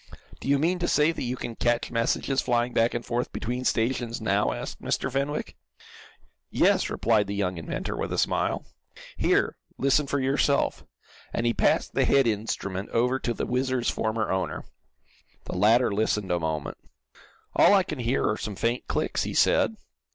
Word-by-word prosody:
"Do - - -8
you 140 0 +4
mean 170 +5 +1
to 175 - 0
say 150 +2 +3
that 165 - -7
you 125 +1 -2
can 115 - -5
catch 120 +1 0
messages 125 +3 0
flying 120 0 0
back 115 +1 +2
and 120 - -3
forth 120 +1 -2
between 125 +3 -3
stations 120 0 0
now?" 105 -2 +1
asked - - -6
Mr. 135 - -1
Fenwick. 140 +3 -2 0.9
"Yes," - - +2
replied 110 -3 +2
the 100 - -3
young 95 -3 -1
inventor, 80 - -4
with - - -3
a - - -2
smile. - - 0 0.5
"Here, - - +1 0.2
listen 140 +2 +2
for 140 - 0
yourself," 140 +1 +1 0.5
and 115 - -1
he 120 - +2
passed - - +1
the - - +2
head 135 -1 +4
instrument 100 -3 -2
over 125 +3 +1
to 120 - -2
the - - -2
WHIZZER's 130 -1 0
former 110 0 -1
owner. 95 0 -2 0.8
The - - -5
latter 110 +4 +4
listened 105 -2 0
a 90 - +1
moment. 80 -2 -3 0.8
"All 205 - +6
I 195 - +4
can 155 -6 -6
hear 120 +2 0
are 110 - 0
some 105 - -5
faint 115 +5 -1
clicks," - - -1
he - - -3
said. - - +3
120 Hz, 175 wpm, -26 LUFS, 110-130 Hz, 0.9 s, All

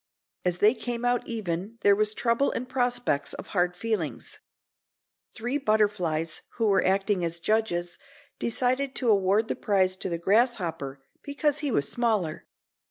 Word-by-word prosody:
As 180 -1 0
they 210 +4 +5
came 245 -2 -4
out 245 0 +1
even 205 -1 -4
there 200 0 +5
was 215 +1 +1
trouble 235 +4 +2
and 250 - -4
prospects 245 - 0
of - - -9
hard 180 -2 +1
feelings. 200 -5 -3 0.9
Three 245 +4 -3
butterflies 205 - 0 0.2
who 225 -3 +2
were 195 - +3
acting 195 0 +1
as 170 0 -2
judges 175 -4 -1 0.4
decided 255 +3 0
to 245 - +1
award 200 +1 +3
the - - -2
prize 190 -2 +1
to 185 - -3
the 170 - -2
grasshopper 170 - 0 0.2
because 290 +1 0
he 295 - -1
was 140 -10 +1
smaller. 215 -10 -1
210 Hz, 150 wpm, -27 LUFS, 175-240 Hz, 0.9 s, they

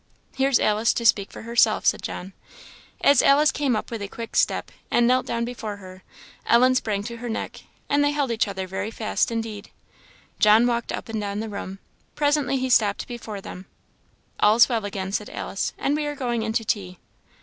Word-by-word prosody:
"Here's 270 -1 +3
Alice 215 +1 +2
to 235 - -3
speak 200 -3 +3
for - - -10
herself," 235 +1 +2
said - - +2
John. 190 +2 -6 0.7
As 280 -2 +5
Alice 295 +2 +5
came 275 -5 0
up 215 - -4
with 230 -2 -4
a 200 - -3
quick 230 +3 -8
step - - +1 0.2
and 240 - +3
knelt 255 +1 +2
down 235 0 -1
before 225 -4 -6
her, 185 -1 -12 0.5
Ellen 255 +2 +5
sprang 210 -5 -1
to 235 +2 -6
her 240 +1 -6
neck, 225 - -5 0.2
and 285 0 +2
they 290 - +3
held 290 -4 -1
each 225 -1 +1
other 190 -1 -4
very 190 +3 -4
fast 225 -1 -1
indeed. 225 -3 -5 0.7
John 215 +3 +6
walked 235 -1 -1
up - - -5
and 220 -1 -3
down 200 0 -3
the 220 0 -4
room. 200 -2 -6 0.4
Presently 290 -3 +1
he 260 0 -1
stopped 215 -5 +2
before 230 -4 -7
them. 185 0 -9 0.7
"All's 215 +3 +6
well 230 -4 -1
again," 195 -1 -4
said 210 +1 -3
Alice, 195 - -3
"and 285 - 0
we 300 -1 -2
are 295 - -3
going 240 -4 -2
in 220 0 -2
to 225 -1 -1
tea." 185 -4 -2
225 Hz, 200 wpm, -24 LUFS, 205-250 Hz, 0.7 s, John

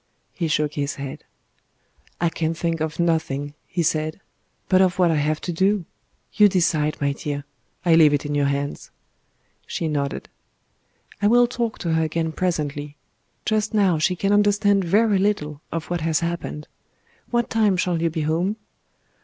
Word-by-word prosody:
He 170 - -2
shook 150 -1 0
his 140 -1 -2
head. 140 -1 -7 1.0
"I 170 - +2
can 165 0 -2
think 165 -1 -2
of 155 0 -3
nothing," 150 -4 0
he 175 -1 -1
said, 155 +2 -1 0.5
"but 185 0 +4
of 185 -1 +2
what 180 -2 +4
I - - +2
have 150 +1 0
to 175 - -3
do. 190 +2 +1 0.5
You 210 - +6
decide, 165 -5 +1
my 140 -1 +1
dear; 145 -1 -5 0.4
I 170 - +5
leave 160 -2 +7
it 145 0 0
in 145 - -2
your 145 -1 +2
hands." 140 +1 -3 0.8
She 165 - -2
nodded. 145 -2 -2 0.9
"I 205 - +4
will 245 +2 +6
talk 235 -2 -2
to 170 -3 -2
her 160 - +2
again 160 +1 -1
presently. 150 -4 -2 0.5
Just 215 0 0
now 190 -6 +3
she 180 +4 +2
can 195 +3 +1
understand 205 -1 +3
very 205 +3 +3
little 155 -8 -1
of 165 +1 -4
what 175 -2 -1
has 160 +1 +1
happened.... 170 -3 -4 0.6
What 240 -1 0
time 215 -4 +3
shall 175 -2 0
you 165 - +2
be 160 0 -3
home?" 165 +7 0
165 Hz, 170 wpm, -23 LUFS, 150-190 Hz, 1.0 s, leave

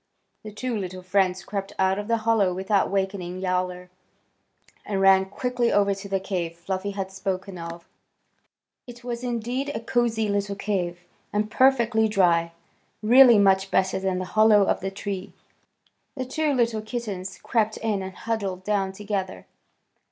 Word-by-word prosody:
The 215 - -9
two 240 +3 -3
little 185 -3 -5
friends 185 0 +1
crept 195 -1 -4
out 190 +1 +2
of 205 - -5
the 230 0 +2
hollow 205 -6 +3
without 195 +2 +1
wakening 190 -2 -2
Yowler, 180 -1 -2 0.9
and 200 -2 -2
ran 195 0 +5
quickly 245 +4 -1
over 200 -1 +3
to 195 +1 -8
the 195 0 0
cave 175 -3 -3
Fluffy 190 +3 -3
had 195 -1 -4
spoken 190 -1 -4
of. 170 0 -8 1.0
It 240 0 -11
was 240 0 -5
indeed 245 +3 -2
a - - -1
cosy 230 -2 0
little 200 0 -1
cave 180 -4 -2 0.3
and 210 +1 -1
perfectly 235 -4 +3
dry, 170 -5 +2 0.5
really 240 +1 +8
much 195 -1 +3
better 190 0 +1
than 190 -1 -1
the 185 - -3
hollow 215 -1 +6
of - - +1
the 195 - -3
tree. 195 0 -6 0.8
The 260 -2 -3
two 300 +4 0
little 235 -4 +1
kittens 215 -5 -5
crept 220 -3 0
in 215 -3 -1
and 190 0 -6
huddled 200 -5 -3
down 195 -2 0
together. 195 - -4
200 Hz, 155 wpm, -25 LUFS, 190-220 Hz, 1.0 s, really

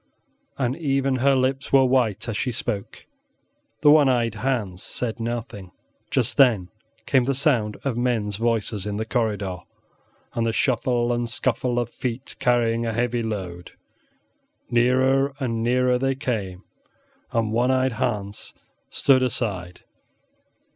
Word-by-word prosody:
and 130 -1 0
even 135 -4 0
her 135 +2 +3
lips 130 +1 0
were 135 -1 +6
white 125 -6 +1
as 115 - -3
she 125 - -1
spoke. 110 -3 -5 0.8
The 150 - +7
one 150 -3 +6
eyed 120 -3 +1
Hans 105 -6 -2
said 120 -1 -4
nothing. 115 -5 -5 0.4
Just - - 0
then 115 -10 +4 0.4
came 130 -3 +3
the 140 - +1
noise 110 -8 +2
of 130 -4 -1
men 120 -3 +1
s 100 - -4
voices 110 -3 -1
in 105 0 -3
the 110 - -2
corridor 105 -6 -1 0.8
and 115 0 0
the 115 - 0
shuffle 120 -1 +1
and 120 0 -2
scuffle 125 0 -1
of 120 -1 -1
feet 125 +1 -5
carrying 120 -1 +2
a 115 -1 -2
heavy 120 +1 0
load. 95 -6 -5 1.0
Nearer 130 +3 +3
and 115 -4 -2
nearer 125 +1 +2
they 135 +1 0
came, 100 -8 -3 0.7
and 115 -2 0
one 120 +3 +2
eyed 130 0 +2
Hans 105 -4 -3 0.3
stood 135 -2 +3
aside. 100 -8 -3
120 Hz, 140 wpm, -24 LUFS, 110-130 Hz, 1.0 s, The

